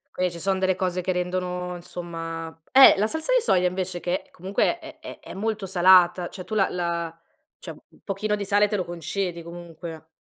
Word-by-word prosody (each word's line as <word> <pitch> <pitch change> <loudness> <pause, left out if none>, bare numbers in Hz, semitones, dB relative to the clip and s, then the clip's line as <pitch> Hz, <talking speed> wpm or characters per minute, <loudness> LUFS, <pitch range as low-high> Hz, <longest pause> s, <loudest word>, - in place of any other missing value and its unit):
Qui 185 0 +1
ci 170 -1 -9
son 190 +2 0
delle 190 0 +2
cose 180 -1 -1
che 185 - -1
rendono 180 0 -2
insomma 165 -2 -6 0.2
eh 270 0 +9
la 210 +2 +2
salsa 320 - -1
di - - +4
soia 180 - +3
invece 180 -1 -3
che 180 +2 -3
comunque 190 - -1
è 315 -1 -12
è - - -10
è - - -11
molto 210 0 -2
salata, 180 -1 +5
cioè 185 - -8
tu 190 - -8
la 195 -3 +2
la 170 -2 -3 0.4
cioè - - -8
un - - -18
pochino 210 +2 -1
di 200 -1 -4
sale 205 +1 +3
te 210 - -2
lo 185 -3 -1
concedi 175 +1 -4
comunque. 165 -1 -9
180 Hz, 200 wpm, -25 LUFS, 175-195 Hz, 0.4 s, eh